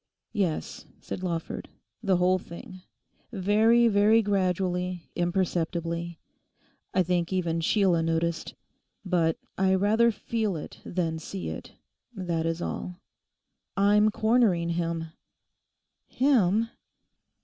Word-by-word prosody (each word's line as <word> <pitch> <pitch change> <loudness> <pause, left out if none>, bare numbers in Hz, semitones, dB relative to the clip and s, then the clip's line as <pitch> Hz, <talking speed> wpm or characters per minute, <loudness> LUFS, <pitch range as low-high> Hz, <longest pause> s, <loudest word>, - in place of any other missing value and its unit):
'Yes,' 190 -8 -2
said - - -6
Lawford, 170 -3 -4 0.3
'the 195 -4 +2
whole 185 +1 +3
thing—very, 205 +6 0
very 215 +1 +5
gradually, 180 -3 -1
imperceptibly. 170 -1 -1 0.7
I 185 - +3
think 175 0 0
even 170 -3 0
Sheila 180 -1 +3
noticed. 165 0 -1 0.5
But 170 -3 +1 0.2
I 190 0 +4
rather 215 +5 +4
feel 220 -3 -2
it 155 - -8
than 165 -3 -2
see 185 +4 -5
it; - - -8 0.4
that 170 -4 -1
is 165 +1 -2
all.... 180 - -4 0.8
I'm 205 +2 +5
cornering 215 -6 +2
him.' 165 -1 -2 1.0
'Him? 230 -5 +2
180 Hz, 100 wpm, -27 LUFS, 170-205 Hz, 1.0 s, very